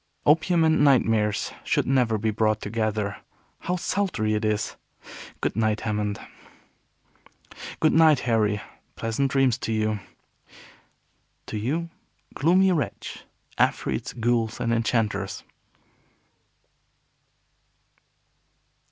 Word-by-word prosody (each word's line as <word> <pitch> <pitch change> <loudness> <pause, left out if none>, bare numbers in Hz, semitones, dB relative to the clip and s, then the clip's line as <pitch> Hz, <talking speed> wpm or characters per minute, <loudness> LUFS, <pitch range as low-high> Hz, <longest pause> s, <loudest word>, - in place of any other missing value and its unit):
Opium 165 +3 +4
and 160 -2 +3
nightmares 115 -7 +2
should - - +1
never 125 -4 +2
be 110 +1 0
brought 110 0 +1
together. 105 -1 -2 0.4
How 180 - -2
sultry 175 - -1
it 105 +1 -1
is! 110 0 -1 0.7
Good - - -1
night, 110 -1 +1
Hammond." 105 -2 -2 1.6
"Good 155 - +3
night, 160 -4 +5
Harry. 105 -3 +1 0.3
Pleasant 115 +5 -1
dreams 130 -2 +2
to 115 - -3
you." 110 -1 0 1.5
"To - - -5
you, 160 +10 -2 0.4
gloomy 185 +6 +3
wretch, 160 -5 -3 0.3
afreets, - - 0
ghouls, 115 -1 0
and 115 -1 0
enchanters." 110 -4 -1
115 Hz, 95 wpm, -25 LUFS, 110-140 Hz, 1.6 s, night